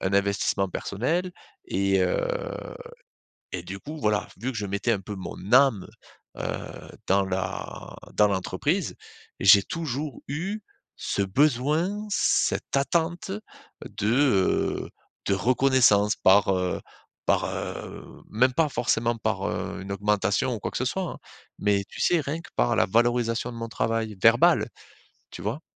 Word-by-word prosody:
un 95 - -1
investissement 100 -1 +1
personnel 160 - -2 0.4
et 95 0 +1
heu, - - +1 1.3
et 90 - -2
du 95 +2 -7
coup 155 +7 -8
voilà. 105 -4 +1
Vu 125 +6 -3
que - - -6
je 105 - -2
mettais 100 +4 0
un 100 - -1
peu 105 +2 -7
mon 95 -2 -7 0.2
âme, 130 -8 +5 0.5
heu, - - -5 0.6
dans 100 +1 +4
la 95 0 -4 0.2
dans 105 - +5
l'entreprise, 100 - -1 0.5
j'ai 100 +1 +8
toujours 150 -1 -4
eu 190 +9 -3 0.4
ce 100 - -2
besoin, 150 - +1
cette 200 - +1
attente 170 +7 0 0.5
de, 105 - -4
heu, 125 -9 +2 0.4
de 100 - +3
reconnaissance 115 -1 +4
par 95 +1 +5
heu 90 -1 -1 0.4
par - - +2
heu - - -7
même 125 +4 +2
pas 155 +3 +2
forcément 115 -2 0
par, - - -1
heu, - - -4
une 95 - -7
augmentation 100 +3 +1
ou - - -6
quoi - - -3
que - - -3
ce 130 - -1
soit 190 +9 -1
hein, 175 - -5 0.4
mais 100 -1 +2
tu - - -10
sais 175 - +3
rien 150 +4 -3
que - - -14
par - - +2
la - - +4
valorisation 120 +2 +1
de 120 - -9
mon 115 0 -4
travail, 115 -2 -1
verbale. 115 +1 +5 0.6
Tu - - -8
vois? - - -3
115 Hz, 150 wpm, -26 LUFS, 100-140 Hz, 1.3 s, j'ai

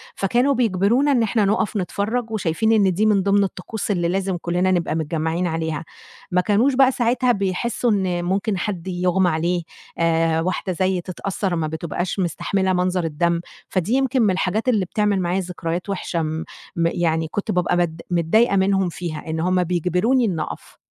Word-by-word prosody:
فكانوا 245 +8 +2
بيجبرونا 235 +4 +2
إن 240 -4 +3
إحنا 215 -1 +1
نُقف 210 +1 0
نتفرّج 220 +5 -2
وشايفين 215 +1 0
إن 200 -4 +4
دي 210 +5 +1
من 200 -3 +3
ضِمن 200 0 +3
الطقوس 195 +3 -4
اللي 175 -3 0
لازم 190 0 -1
كلّنا 180 +2 +1
نبقى 170 -3 0
متجمّعين 160 +2 -1
عليها، 160 -1 -2 0.5
ما 180 - +3
كانوش 220 +8 +2
بقى 265 0 +5
ساعتها 245 0 +1
بيحسّوا 205 +4 0
إن 185 -4 0
ممكن 195 +2 0
حد 190 -2 -4
يغمى 180 0 +1
عليه 170 +2 0 0.4
آآ، 165 -1 +2
واحدة 185 +2 -2
زيّي 185 0 0
تتأثّر 185 +1 -3
ما 160 -2 -1
بتبقاش 170 +4 -3
مستحملة 190 +2 0
مَنظر 180 0 0
الدم، 170 +2 0 0.3
فدي 185 +5 -1
يمكن 265 -1 +2
من 205 -4 +4
الحاجات 205 +6 0
اللي 205 -6 +2
بتعمل 205 +1 0
معايا 175 +2 0
ذكريات 180 0 -4
وِحشة، 180 -3 -2
م 160 +1 -2 0.3
م 170 0 +2
يعني 160 -2 0
كنت 205 - -2
بابقى 180 -1 +1
بد 165 -2 -1
متضايقة 195 +6 +3
منهُم 195 -1 +2
فيها، 165 -2 -6
إن 160 0 -2
هُم 180 +2 +2
بيجبروني 180 +9 +1
إني 175 -7 -1
أقف. - - -7
185 Hz, 170 wpm, -22 LUFS, 170-210 Hz, 0.5 s, بقى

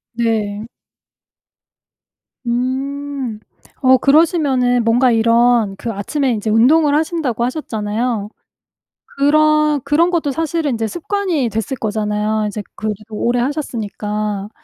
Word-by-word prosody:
네. 220 -3 -1 1.8
음. 260 0 -3 0.4
어 260 0 +6
그러시면은 275 -4 +3
뭔가 240 +3 +3
이런 230 -2 +3
그 230 - -4
아침에 255 +7 -1
인제 220 -1 -2
운동을 285 +7 +4
하신다고 305 -7 -1
하셨잖아요. 225 -4 -2 0.9
그런 305 +1 +3
그런 295 +5 +2
것도 325 -5 0
사실은 320 +1 -1
인제 225 -2 -1
습관이 345 - -1
됐을 225 +4 -3
거잖아요, 215 0 -1
이제 210 0 -5
그 215 - -5
뒤로 215 +1 -6
오래 240 +2 +1
하셨으니까. 215 -6 -3
245 Hz, 255 characters per minute, -18 LUFS, 215-290 Hz, 1.8 s, 어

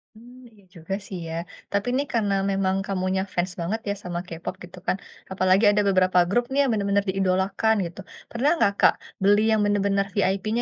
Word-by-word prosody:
Mmm, 245 +3 -15
iya 205 -2 -22
juga 165 +3 -6
sih 185 - -6
ya. 160 - -5 0.4
Tapi 200 +3 -1
nih, 275 - +1
karena 210 -4 +1 0.2
memang 190 -1 +1
kamunya 190 -1 -1
fans 180 +1 -1
banget 195 +7 -2
ya - - +1
sama 175 -1 -4
K-pop 165 +1 -6
gitu 180 +1 -12
kan. - - +1 0.3
Apalagi 185 +2 +3
ada 210 0 +2
beberapa 185 -1 +3
grup 240 +5 +2
nih 275 - +1
yang - - +1
benar-benar 200 -1 +1
diidolakan 190 +3 +1
gitu. 170 - -12 0.3
Pernah 245 +5 +1
nggak, 200 - +3
Kak, - - +6 0.3
beli 205 +2 +5
yang 220 -1 +3
benar-benar 200 -1 +1
VIP-nya 200 +3 0
195 Hz, 185 wpm, -24 LUFS, 185-210 Hz, 0.4 s, Kak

